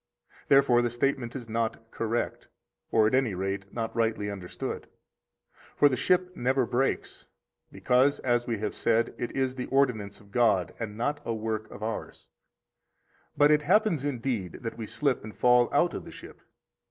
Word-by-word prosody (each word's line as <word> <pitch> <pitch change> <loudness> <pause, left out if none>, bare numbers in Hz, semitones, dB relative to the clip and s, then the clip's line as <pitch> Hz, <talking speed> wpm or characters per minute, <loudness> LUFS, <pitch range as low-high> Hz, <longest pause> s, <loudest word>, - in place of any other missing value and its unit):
Therefore 135 -3 +5
the 120 - 0
statement 120 0 -1
is 120 -4 -6
not 115 0 -3
correct, 115 +1 -2 0.4
or 110 -1 +4
at 110 - +1
any 130 -7 +2
rate 95 +1 -3
not 115 -2 -4
rightly 110 -3 0
understood. 95 -3 -6 0.9
For 145 - +5
the 130 - 0
ship 180 +6 +1
never 130 -1 +1
breaks, 130 +3 -2 0.4
because 130 +3 +2
(as 120 -1 +1
we 115 -2 -1
have 105 0 -3
said) 115 0 +1
it 120 - -3
is 130 -1 0
the 130 -1 -5
ordinance 115 -7 0
of 100 -1 -20
God, 110 -6 +2
and 105 -2 -5
not 145 +5 -1
a 115 - -2
work 110 0 -3
of 105 - -9
ours; 110 0 -5 1.1
but 145 +1 +6
it 150 0 +4
happens, 180 -2 +2
indeed, 120 -8 -2
that 115 -2 -5
we 110 -2 -6
slip 140 0 -1
and 110 0 -10
fall 125 -1 +4
out - - +2
of - - -5
the - - -10
ship. - - -12
120 Hz, 170 wpm, -28 LUFS, 110-135 Hz, 1.1 s, but